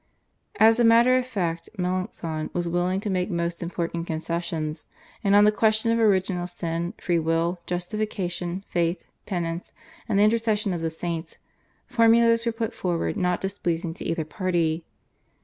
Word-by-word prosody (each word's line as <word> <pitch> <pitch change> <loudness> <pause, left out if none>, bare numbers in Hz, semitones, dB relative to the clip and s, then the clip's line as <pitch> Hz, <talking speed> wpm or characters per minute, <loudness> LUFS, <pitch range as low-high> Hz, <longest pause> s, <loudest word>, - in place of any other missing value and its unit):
As 225 +2 +6
a - - +5
matter 235 +2 +6
of 255 - -4
fact 170 -8 -2
Melanchthon 180 -4 -2
was 175 -1 -1
willing 175 +2 0
to 210 - -3
make 180 0 0
most 170 -2 -2
important 170 -1 -3
concessions, 160 -1 -3 0.4
and 200 0 +4
on 205 - +7
the 210 - +6
question 220 +2 +2
of 230 - +2
original 190 -4 +2
sin, 170 -1 -3
free 175 -2 0
will, 165 +2 0
justification, 180 -1 -3
faith, 170 0 0 0.2
penance, 170 -3 -3 0.3
and 205 - +2
the 205 - +5
intercession 215 -2 +2
of 170 - -3
the 165 - 0
saints, 165 +1 -5 0.5
formulas 230 -1 +4
were - - +3
put 225 0 -3
forward 175 -2 -1
not 180 -2 0
displeasing 175 -4 -2
to - - -9
either 165 -1 -1
party. 170 -2 0
180 Hz, 155 wpm, -25 LUFS, 170-215 Hz, 0.5 s, on